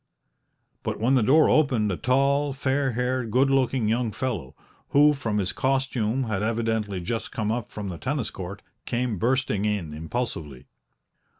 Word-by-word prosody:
But - - -3
when 120 +5 +2
the 130 - +4
door 145 +8 +5
opened 125 -9 +3
a - - 0
tall, 140 +5 +2
fair 135 -1 0
haired, 125 0 -1
good 135 +4 +3
looking 130 -3 +2
young 115 +1 +1
fellow, 105 - -4 0.3
who 150 +1 +6
from 115 -7 -2
his 95 -3 0
costume 130 -2 0
had 110 -5 -2
evidently 110 -3 -1
just 115 +6 -3
come 110 -1 -1
up 120 -1 -3
from 105 -2 -5
the 85 -3 -6
tennis 130 -2 -2
court, 95 +2 -7 0.2
came 120 -5 -1
bursting 125 -4 +1
in 100 -7 -1
impulsively. 80 - -4
120 Hz, 160 wpm, -25 LUFS, 105-130 Hz, 0.3 s, who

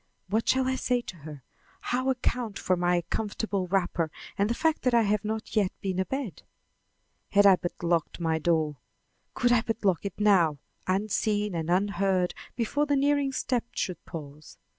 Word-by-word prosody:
What 220 +3 0
shall 260 0 +3
I 260 - +1
say 250 -1 +1
to 185 - -9
her, 150 -3 -10 0.4
how 255 +2 0
account 245 -4 -1
for 185 - +1
my 175 0 +1
comfortable 205 -3 -2
wrapper 175 -3 0 0.3
and 200 +2 +1
the 235 - 0
fact 320 +3 +1
that 250 -2 +2
I 230 - +5
have 210 -1 +1
not 220 +2 -4
yet 200 -4 +3
been 190 -2 -2
abed? 250 +2 -3 0.9
Had 205 0 +5
I 195 -2 +8
but 175 0 -6
locked 170 -1 0
my 160 -1 0
door! 155 -3 +1 0.6
Could 245 -1 +2
I 240 -2 +5
but 225 -2 -3
lock 185 -4 +2
it 200 -1 -5
now, 185 -8 +4 0.3
unseen 205 +1 0
and 165 -1 -3
unheard 190 -1 +1 0.2
before 285 +6 0
the 290 - +2
nearing 285 0 +2
step 250 -2 -1
should 180 -3 -3
pause! 150 -2 -9
200 Hz, 175 wpm, -28 LUFS, 175-235 Hz, 0.9 s, I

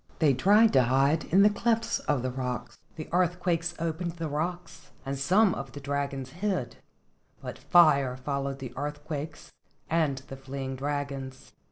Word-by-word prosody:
They 150 -4 +4
tried 205 - +5
to 130 - +6
hide 135 +5 +2
in 195 +4 +4
the 210 - +7
clefts 230 +2 0
of 140 -4 -1
the 130 - -1
rocks. 125 -1 -4 0.2
The 155 - -7
earthquakes 175 -1 0
opened 165 +1 -3
the 165 -1 -4
rocks 170 +4 -4 0.2
and 135 +1 -2
some 185 +9 +3
of 135 -2 -6
the 145 - -7
dragons 140 -2 -3
hid, 180 - -2 0.6
but - - -8
fire 140 -7 +4
followed 140 +1 -3
the 130 -3 -7
earthquakes 150 +2 -5 0.4
and 155 -5 +2
the 135 - -8
fleeing 135 0 -5
dragons. 135 -1 -4
145 Hz, 155 wpm, -28 LUFS, 135-175 Hz, 0.6 s, the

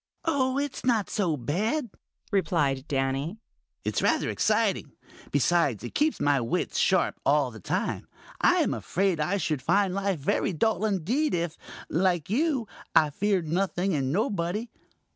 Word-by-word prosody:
"Oh, 270 -5 +1
it's 285 -1 -3
not 230 -6 +1
so 175 -8 0
bad," 210 - -1 0.4
replied 150 -9 +1
Danny. 135 +6 -1 0.5
"It's - - -1
rather - - +2
exciting. 215 -8 +1 0.4
Besides, 145 - +2
it 120 - -6
keeps 305 +1 +1
my 145 -2 +2
wits 115 - -1
sharp - - +2
all 140 -3 +2
the 110 - -10
time. - - -2 0.3
I - - +5
am - - +1
afraid 190 -2 0
I 180 +7 +1
should 155 -6 -1
find 185 +6 +2
life 195 -1 0
very 145 +6 0
dull 215 +4 +1
indeed 220 - 0
if, 170 -1 -2 0.3
like 175 -1 0
you, 270 -2 +1 0.3
I 155 -2 +5
feared 190 +1 0
nothing 185 +2 0
and 135 -3 0
nobody. 205 - -1
180 Hz, 145 wpm, -27 LUFS, 150-215 Hz, 0.5 s, I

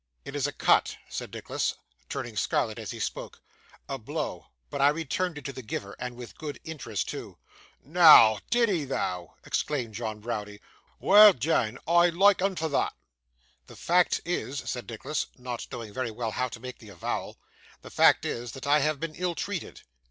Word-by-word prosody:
'It 140 - -7
is 145 -1 +1
a - - -3
cut,' - - +2
said - - -6
Nicholas, - - -2 0.3
turning - - -5
scarlet - - 0
as - - -6
he - - -6
spoke, - - -5 0.5
'a 135 -1 -4
blow; 120 - -5 0.2
but - - -2
I 140 - +7
returned 165 +3 -2
it 145 - -9
to 140 - -4
the 130 - -7
giver, 100 -3 -5
and 125 -1 -5
with 120 -1 -11
good 150 -3 -6
interest 160 -2 -4
too.' - - -7 0.5
'Noa, 150 - +8
did 240 -1 +3
'ee 180 -7 0
though?' 90 - -3
exclaimed 125 -7 -2
John 110 -1 -4
Browdie. 105 -2 -5 0.4
'Well 210 0 +8
deane! 125 -5 0
I 170 +1 +5
loike 195 +3 +4
'un 195 0 +1
for 160 -2 -1
thot.' 145 - 0 0.7
'The - - -13
fact 175 0 +2
is,' 145 -6 -3
said 125 -1 -4
Nicholas, 120 +6 -3
not 125 -2 -6
very 115 -4 -7 0.2
well 115 +1 -3
knowing - - -7
how 125 - 0
to 115 - -9
make 125 +2 -8
the 110 - -13
avowal, 90 -4 -4 0.5
'the - - -11
fact - - +5
is, 120 -1 -4
that 135 - -8
I 145 +1 +4
have 150 0 0
been 165 0 -4
ill 175 +1 -2
treated. 200 0 -5
140 Hz, 185 wpm, -28 LUFS, 115-165 Hz, 0.7 s, Noa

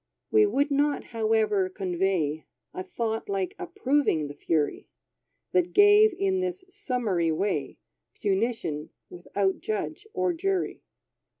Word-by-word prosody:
We 425 -1 +5
would 285 -6 +1
not, 285 +1 +1
however, 215 -4 +1
convey 180 -5 -1 0.3
A - - -4
thought 225 - -3
like 390 -1 -1
approving 285 - 0
the - - -7
fury, 150 0 -1 0.6
That 355 -1 +1
gave, 415 +1 +7
in 380 -1 +1
this 370 0 -3
summary 220 - -1
way, 155 -5 -1 0.4
Punition 195 -7 -1 0.2
without 190 +2 -1
judge 260 - -4
or 365 -5 0
jury. 380 +2 -1
230 Hz, 115 wpm, -27 LUFS, -, 0.6 s, gave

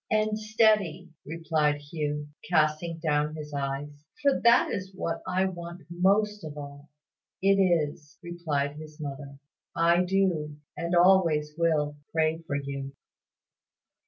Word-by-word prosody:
"And 215 0 +1
steady," 215 -6 +2 0.2
replied 155 -2 +1
Hugh, 150 0 -4 0.2
casting 160 0 +1
down 150 -1 0
his 150 -1 -8
eyes; 140 +1 -4 0.2
"for 280 -1 +3
that 235 +2 +5
is 190 0 -5
what 170 -3 -3
I 185 +1 +1
want 175 -1 -6
most 205 +4 +2
of 150 -1 -7
all." 145 0 -9 0.5
"It 195 +1 +3
is," 155 -4 0
replied 150 -5 -2
his 155 0 -11
mother. 140 -1 -7 0.4
"I 170 +2 +4
do, 180 -6 0 0.2
and 170 +1 -1
always 170 -5 +4
will, 155 -3 +1
pray 160 0 +1
for 140 - -2
you." 140 -1 -4
160 Hz, 130 wpm, -28 LUFS, 150-185 Hz, 0.5 s, that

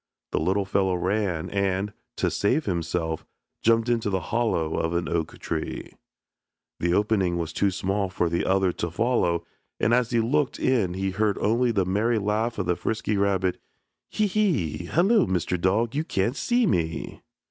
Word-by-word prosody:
The - - +1
little 95 +5 +1
fellow 95 -1 +1
ran 90 -2 -1
and, 100 +1 0 0.2
to - - 0
save 130 +10 +1
himself, 85 -3 -2 0.4
jumped 115 +1 +3
into 115 -3 +1
the 95 -1 0
hollow 110 -9 +1
of 80 +1 -1
an 85 - 0
oak 85 -2 -2
tree. 80 -1 -4 0.9
The 85 - +1
opening 95 -3 +2
was 80 -1 -3
too 100 - +2
small 95 +1 -1
for 90 -2 0
the 85 +1 0
other 95 -1 +2
to 85 0 -3
follow 90 -4 +1 0.3
and 115 - +2
as 120 -1 +3
he 120 - +2
looked 130 +4 +1
in 110 -9 +1
he 95 0 -1
heard 105 +1 0
only 120 +4 +2
the 100 -5 +1
merry 110 +5 +1
laugh 110 +3 -1
of 100 - -1
the 90 0 +1
frisky 110 +1 -2
rabbit, 95 -2 +1 0.5
"Hee, 215 - +1
hee! 175 - 0
hello, 190 - +3
Mr. 90 -1 -1
Dog, 110 +6 +1
you 150 +2 0
can't 115 -3 -1
see 240 +9 +2
me." 80 - -1
100 Hz, 170 wpm, -25 LUFS, 90-115 Hz, 0.9 s, jumped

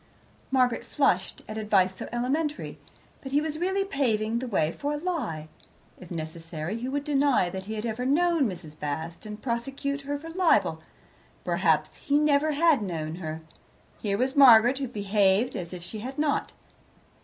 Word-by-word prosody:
Margaret 255 -3 +2
flushed 185 -10 0
at 215 +1 -5
advice 195 -3 +2
so - - -6
elementary, 290 +6 -2 0.4
but 270 - -8
he 285 - +4
was 310 0 -3
really 380 +2 0
paving 235 - 0
the 255 - -4
way 160 -8 +1
for 290 +10 -3
a - - -2
lie. 280 - -3 0.5
If 180 - -12
necessary 165 +2 -5
he 250 +2 -3
would 285 +1 -2
deny 280 -10 +2
that 190 0 -6
he 220 +2 -5
had 215 +1 -4
ever 230 +2 -2
known 310 0 +3
Mrs. 160 -5 -9
Bast, 160 +6 -4
and 210 0 -7
prosecute 270 +3 -2
her 285 +1 -3
for 325 +3 -9
libel. 355 -1 +2 0.6
Perhaps - - +1
he 285 - +1
never 300 0 +3
had 310 -3 +4
known 165 -4 -4
her. 160 -2 -5 0.6
Here 200 -2 0
was 260 +4 0
Margaret, 250 -1 +7
who 270 - -2
behaved 205 +1 +2
as 175 -5 -5
if 180 -2 -8
he 195 +5 -7
had 260 +5 -6
not. 300 -1 0
240 Hz, 170 wpm, -27 LUFS, 190-285 Hz, 0.6 s, Margaret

